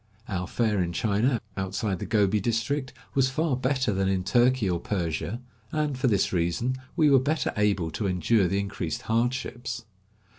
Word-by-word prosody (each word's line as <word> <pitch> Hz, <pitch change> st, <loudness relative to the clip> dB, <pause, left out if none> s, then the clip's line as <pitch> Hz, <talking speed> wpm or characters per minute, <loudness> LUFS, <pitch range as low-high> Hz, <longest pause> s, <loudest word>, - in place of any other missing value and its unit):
Our 90 Hz, -3 st, -3 dB
fare 110 Hz, -5 st, +1 dB
in 85 Hz, -1 st, -1 dB
China, 110 Hz, +6 st, +1 dB, 0.2 s
outside 95 Hz, 0 st, -2 dB
the -, -, -5 dB
Gobi 105 Hz, -2 st, +3 dB
district, 120 Hz, +6 st, -1 dB, 0.2 s
was 135 Hz, -1 st, +3 dB
far 150 Hz, +1 st, 0 dB
better 130 Hz, -2 st, 0 dB
than 95 Hz, 0 st, +1 dB
in 95 Hz, -1 st, +1 dB
Turkey 120 Hz, +1 st, +3 dB
or 90 Hz, -2 st, 0 dB
Persia, 90 Hz, +4 st, -2 dB, 0.3 s
and, 150 Hz, -2 st, 0 dB
for 130 Hz, +1 st, 0 dB
this 100 Hz, -5 st, +2 dB
reason, 90 Hz, +9 st, 0 dB, 0.2 s
we 155 Hz, -4 st, +4 dB
were 135 Hz, -, +7 dB
better 145 Hz, +2 st, 0 dB
able 100 Hz, -6 st, +1 dB
to 100 Hz, +6 st, -2 dB
endure 95 Hz, +2 st, +2 dB
the 95 Hz, +3 st, 0 dB
increased 100 Hz, -4 st, -3 dB
hardships. 120 Hz, +1 st, -2 dB
110 Hz, 165 wpm, -27 LUFS, 95-130 Hz, 0.3 s, were